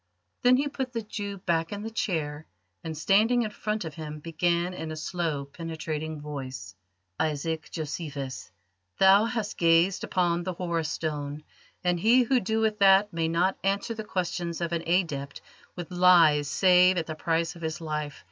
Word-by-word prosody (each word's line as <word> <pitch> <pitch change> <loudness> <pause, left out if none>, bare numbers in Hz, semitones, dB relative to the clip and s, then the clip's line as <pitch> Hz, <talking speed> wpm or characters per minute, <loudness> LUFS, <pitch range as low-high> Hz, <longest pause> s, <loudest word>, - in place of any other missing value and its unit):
Then 250 0 +5
he 285 +2 0
put 265 -3 -4
the 230 -1 -3
Jew 205 -1 -5
back 165 -3 -1
in 205 0 -5
the 225 - -5
chair, 160 -10 -2 0.4
and 160 -1 -5
standing 220 +8 +3
in 215 - -3
front 210 -2 -3
of 160 - -6
him 155 -2 -7
began 170 +3 0
in 160 -3 -6
a - - -4
slow, 155 -3 -3
penetrating 155 0 -5
voice: 135 -10 -7 0.5
"Isaac 160 +1 -2
Josephus, 140 - -5 0.5
thou 195 +2 +6
hast 230 -3 -3
gazed 170 +3 +3
upon 175 -2 +1
the 185 +1 -3
Horus 170 -3 -2
Stone, 150 -2 -4 0.4
and 175 -1 +1
he 235 +7 +5
who 255 +2 +2
doeth 220 0 0
that 195 +1 +5
may 165 -1 0
not 175 +4 +1
answer 200 +4 0
the 220 -1 -6
questions 175 -3 -3
of 170 -1 -2
an 170 -1 -1
Adept 150 -6 -1 0.4
with 175 0 -7
lies 170 -5 +5
save 180 +2 +5
at 165 - 0
the 155 - -5
price 165 +1 -1
of 170 - -12
his 160 0 -3
life. 150 -3 -4
170 Hz, 170 wpm, -27 LUFS, 155-195 Hz, 0.5 s, thou